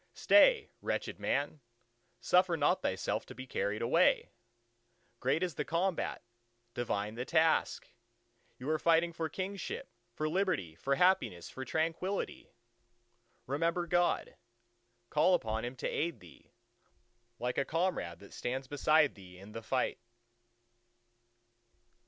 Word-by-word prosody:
"Stay, 475 -3 +5
wretched - - -3
man! 145 +1 -1 0.6
suffer 180 -2 +3
not 145 -1 +2
thyself - - -1
to - - -12
be 130 +2 -7
carried 105 -4 -2
away!" 115 - +3 0.9
Great 135 +7 +1
is 180 -3 -1
the 150 - -2
combat, 170 +4 -1 0.5
divine 105 -4 -2
the 120 +2 -4
task! 160 +3 +2 0.7
you 125 - -8
are 155 0 +1
fighting 170 +1 +3
for 160 -1 -3
Kingship, 200 - -5 0.2
for 155 - -2
Liberty, 175 - 0
for 135 +12 -1
Happiness, 130 - +2
for 130 - -6
Tranquillity. 165 +7 -2 1.0
Remember 165 +6 0
God: 175 0 +1 0.7
call 180 +4 +4
upon 110 -7 -2
Him 120 +2 -4
to 130 - -3
aid 165 -7 -2
thee, 85 -6 -17 0.9
like 125 +1 -1
a - - +2
comrade 165 - -1
that 100 - -13
stands 130 +2 -3
beside 150 +1 +3
thee 90 -3 -14
in 100 +3 -12
the 115 - -6
fight. 125 +3 -1
150 Hz, 125 wpm, -33 LUFS, 120-175 Hz, 1.0 s, Stay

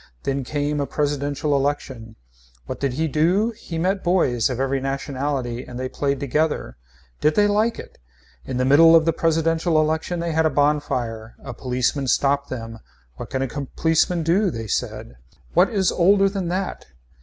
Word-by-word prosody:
Then 135 0 -1
came 145 +2 -2
a 140 - -1
presidential 145 0 -1
election. 135 -5 -3 0.5
What - - -6
did 135 -3 -1
he 160 +5 0
do. 175 - +2
He 210 -7 -8
met 190 +4 0
boys 135 -11 +2
of 125 -1 -3
every 135 0 0
nationality 135 -2 -3
and 125 0 -8
they 130 - -2
played 140 +1 -2
together. 145 - -1 0.4
Did 150 0 +2
they 205 - +4
like 215 +3 +1
it. - - -11 0.4
In 125 - -4
the 125 - +1
middle 165 +5 +7
of 160 -1 +5
the 165 - +2
presidential 165 0 +1
election 160 +3 -1
they 170 0 -2
had 160 0 +2
a - - +1
bonfire. 130 -6 -1
A 135 - -6
policeman 130 +3 -1
stopped 140 +3 +1
them. 115 -2 -6 0.4
What - - -7
can 130 0 -1
a - - -1
policeman 160 +5 0
do, 185 +5 +2
they 115 -8 -5
said. 65 - -4 0.4
What - - +4
is 195 -4 +1
older 195 +3 +4
than 195 -2 -3
that. 185 +2 -3
145 Hz, 175 wpm, -22 LUFS, 130-165 Hz, 0.5 s, middle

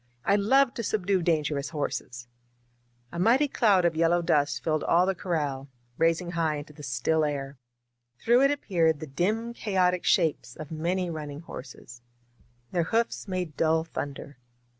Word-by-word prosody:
I 200 - +4
love 250 +6 +3
to 235 - -4
subdue 195 -3 0
dangerous 150 -4 0
horses 125 -5 -4 0.4
!" 120 0 -40
A 170 - -4
mighty 250 +10 +4
cloud 205 -9 +3
of 170 -2 +2
yellow 170 +2 +2
dust 145 -3 +1
filled 155 -1 0
all 175 +2 +3
the 195 - +1
corral, 145 -7 -3 0.3
rising 165 +2 +1
high 165 -3 0
into 145 +1 -8
the 150 - -13
still 155 +4 0
air. 140 -2 -3 0.6
Through 240 - +3
it - - +4
appeared 170 - +1
the 155 - -6
dim 210 +11 -1
chaotic 185 -5 +1
shapes 150 -6 +1
of 155 -1 -9
many 175 +3 -1
running 150 -2 -6
horses. 125 -5 -11 0.7
Their 170 -2 0
hoofs 230 +3 -1
made 180 -5 -3
dull 160 +2 +2
thunder. 145 -3 -7
165 Hz, 160 wpm, -27 LUFS, 145-185 Hz, 0.7 s, I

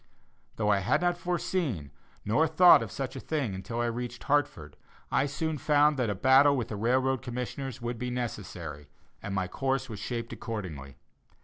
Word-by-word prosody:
Though 105 -1 +1
I 100 - +3
had 95 - +2
not 175 0 +2
foreseen 170 - -2 0.3
nor 150 +10 +3
thought 180 -1 +7
of 110 -3 -5
such 135 -1 -4
a - - -5
thing 140 -8 -2
until 115 +5 -4
I - - +1
reached 120 +1 -4
Hartford, 85 - 0 0.4
I 135 - +2
soon 155 +2 -2
found 150 +2 +3
that 120 -4 +1
a 100 - -1
battle 135 +6 +5
with 120 - -3
the 105 - -4
railroad 130 +4 +1
commissioners 125 +1 -5
would 120 -1 -3
be 125 - -3
necessary, 90 - -5 0.3
and 100 - -4
my 95 -1 0
course 135 +5 -1
was 105 -3 -6
shaped 115 +1 -4
accordingly. 80 - -6
120 Hz, 180 wpm, -29 LUFS, 105-140 Hz, 0.4 s, thought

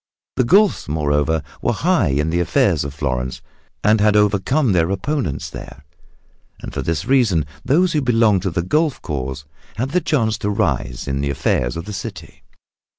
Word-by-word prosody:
The - - +2
Guelfs, 195 - +3
moreover, 75 +1 0 0.2
were - - +1
high 155 - +2
in 75 +3 0
the 85 - +1
affairs 85 - +2
of 70 - -5
Florence 65 -3 -3 0.4
and 105 +1 +4
had 105 0 +4
overcome 105 +6 +2
their 85 -2 +2
opponents 100 - -2
there. 75 - -10 0.7
And - - -8
for - - -3
this 80 0 -2
reason 115 - +2 0.2
those 175 +6 +2
who 150 - +1
belonged 115 -6 +3
to 95 - -1
the 85 0 -2
Guelf 150 - +1
cause 70 -2 -4 0.3
had 130 +5 -2
the 180 - +2
chance 110 -10 0
to 105 - -2
rise 75 - -1
in 70 0 -1
the 70 - -1
affairs - - 0
of 85 - -5
the 105 - -6
city. - - -8
95 Hz, 175 wpm, -20 LUFS, 75-125 Hz, 0.7 s, and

